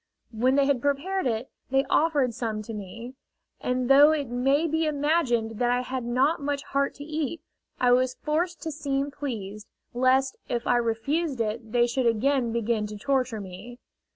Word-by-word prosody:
When 250 +4 +2
they 280 -1 +4
had 275 -3 +1
prepared 285 +6 0
it, 230 +2 -2 0.2
they 270 +1 +2
offered 285 -5 +2
some 220 -2 -3
to 225 - -7
me, 225 +5 -8 0.5
and 250 0 -1
though 285 +3 +7
it 295 -2 -1
may 270 +6 +2
be 320 0 0
imagined 280 -7 0
that 245 -1 +2
I 245 0 +2
had 255 0 -4
not 265 +7 +1
much 285 0 -2
heart 280 0 -1
to 285 - -9
eat, 310 +1 -3 0.4
I 250 -1 +4
was 255 +1 +3
forced 335 +3 -2
to 320 - -3
seem 285 -1 -2
pleased, 215 -8 -6 0.3
lest 260 +2 +2
if 240 -1 -2
I 245 - +3
refused 260 +6 -1
it 225 0 -3
they 240 0 +4
should 240 +1 0
again 240 +2 +1
begin 225 -2 0
to 210 0 -8
torture 255 -1 0
me. 200 +5 -9
255 Hz, 180 wpm, -26 LUFS, 235-285 Hz, 0.5 s, though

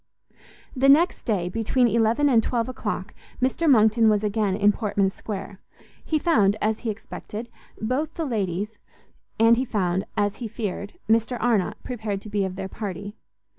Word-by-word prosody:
The 270 +1 +3
next 325 +6 +4
day, 195 -7 0
between 225 +5 +1
eleven 235 +5 +2
and 240 -5 +5
twelve 235 0 -1
o'clock, 255 - -4 0.3
Mr 265 +6 +1
Monckton 220 -2 +5
was 210 -1 +2
again 210 -2 0
in 205 0 +4
Portman 200 -3 0
Square; 195 -1 -7 0.4
he 315 - 0
found, 215 - +3
as 215 0 0
he 235 - -3
expected, 220 +1 -7 0.3
both 265 +8 -2
the 330 - -2
ladies, 210 - -2 0.6
and 230 +1 +6
he 255 - +1
found, 190 -6 -1
as 205 -1 0
he 240 - -5
feared, 205 -2 -5
Mr 225 +2 +2
Arnott 215 -3 +1
prepared 215 -5 -3
to 210 - -10
be 205 -1 +1
of 185 -1 -5
their 190 0 -4
party. 200 0 -6
220 Hz, 165 wpm, -24 LUFS, 200-240 Hz, 0.6 s, and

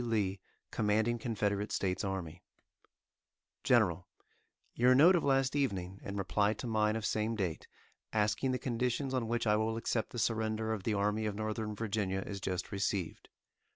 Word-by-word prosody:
Lee, 105 -5 0 0.3
Commanding 110 +2 +1
Confederate 105 -3 -1
States 95 0 -1
Army:_ 90 -4 -4 1.2
GENERAL: 90 -7 +3 0.7
Your 125 +2 +4
note 165 +8 +7
of 175 - +1
last 135 -1 +2
evening, 100 -9 -1
in 100 0 -5
reply 100 +2 +1
to - - -7
mine 110 -2 +1
of 110 -1 -3
same 110 +2 0
date, 90 -7 -3 0.4
asking 110 +4 +1
the 130 - 0
conditions 125 +2 -1
on 125 -3 0
which 120 +1 -1
I 105 -1 +4
will 110 +1 0
accept 115 -1 -1
the - - -8
surrender 110 -1 0
of 110 - -3
the 110 - +1
Army 105 +2 0
of 105 - -3
Northern 110 0 -3
Virginia 100 -3 -1
is 100 -2 -6
just 90 -1 -3
received. 100 -3 -2
110 Hz, 160 wpm, -33 LUFS, 100-115 Hz, 1.2 s, note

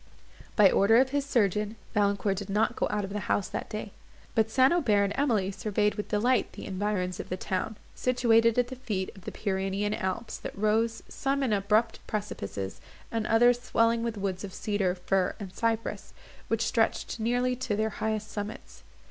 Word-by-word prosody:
By 205 -3 +7
order 220 +3 +5
of 260 +1 +4
his 285 -1 -1
surgeon, 210 -3 +1 0.2
Valancourt 200 -1 +1
did 200 0 -5
not 220 +4 +1
go - - 0
out 210 -1 -1
of 195 +1 -5
the 210 - -1
house 195 - +1
that - - -4
day; 215 -1 -5 0.4
but 220 -2 +2
St. 260 +5 +4
Aubert 220 -13 +3
and 200 0 0
Emily 220 -9 +1
surveyed 210 +2 0
with 210 0 -5
delight 230 +3 +1
the - - -8
environs 190 -2 -2
of - - -6
the 185 - -2
town, 190 +4 -2 0.2
situated 230 -2 +3
at 245 0 +2
the 260 - -6
feet 210 -7 -3
of 190 - -15
the - - -4
Pyrenean 195 +1 -1
Alps, 190 +3 -3
that - - -7
rose, 220 +2 +1
some 275 +1 -1
in 240 -5 +1
abrupt 210 +3 +2
precipices, 100 - -4 0.3
and 225 -2 -1
others 240 +2 +4
swelling 230 -1 +2
with 230 -2 -2
woods 195 -1 -3
of 195 -2 -7
cedar, 200 -4 0
fir, 185 +1 0
and 195 -3 -7
cypress, 230 +2 -2 0.3
which 225 0 0
stretched 230 0 0
nearly 245 +3 +1
to 240 -4 -1
their 215 +1 0
highest 215 0 -3
summits. 210 +2 -6
215 Hz, 185 wpm, -28 LUFS, 200-230 Hz, 0.4 s, By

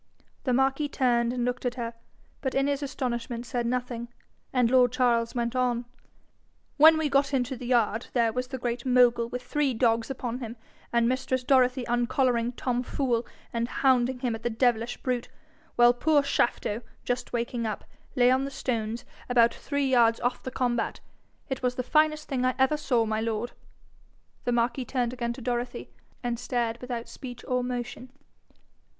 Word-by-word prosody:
The 255 - +1
marquis 270 +3 +2
turned 240 -4 +2
and 245 -1 -1
looked 250 +1 -2
at 245 -1 -1
her, 235 -2 -4 0.5
but 265 - -2
in 270 0 +3
his 285 0 0
astonishment 240 -3 -3
said 240 -1 -2
nothing, 245 -1 -2 0.4
and 250 -2 +2
lord 250 -2 +5
Charles 240 -2 +1
went 235 0 -1
on. 245 -1 +1 0.9
'When 315 +2 +8
we 315 -1 +1
got 275 0 +2
into 255 0 0
the 245 0 -7
yard, 235 -2 +1
there 230 -3 +2
was 250 0 -2
the 260 0 -5
Great 240 -1 -3
Mogul 245 -2 +4
with 250 +1 -5
three 270 0 0
dogs 230 0 +2
upon 250 -2 -4
him, 235 -1 -6 0.3
and 235 -1 +3
mistress 255 0 0
Dorothy 255 -1 +3
uncollaring 240 0 +1
Tom 245 0 -1
Fool 245 -2 -1 0.3
and 235 0 0
hounding 255 0 +2
him 245 -3 0
at 225 - -6
the 240 - -1
devilish 235 0 +1
brute; 250 -2 -1 0.5
while 240 0 +6
poor 290 +3 +3
Shafto, 235 -4 0 0.2
just 245 0 -2
waking 235 -1 -2
up, 215 - -4 0.3
lay 250 -1 +5
on 260 +1 +2
the 275 - -3
stones, 235 -4 -3 0.2
about 235 -1 +5
three 285 -1 -2
yards 235 -3 +4
off 245 +1 -1
the - - -5
combat. 245 -2 -1 0.5
It 265 -1 -3
was 250 -1 0
the 255 - -2
finest 305 +2 +2
thing 255 -2 -1
I 255 0 +2
ever 265 +3 +3
saw, 250 -6 +1
my 215 0 -1
lord.' 225 +1 -2 0.9
The 245 - +1
marquis 240 +2 0
turned 245 -1 -1
again 235 -1 -2
to 255 - -10
Dorothy, 240 0 -3 0.3
and 240 -1 -2
stared 240 -2 -1
without 245 -2 -4
speech 245 -3 -9
or 250 0 +1
motion. 245 0 -5
245 Hz, 175 wpm, -27 LUFS, 235-260 Hz, 0.9 s, When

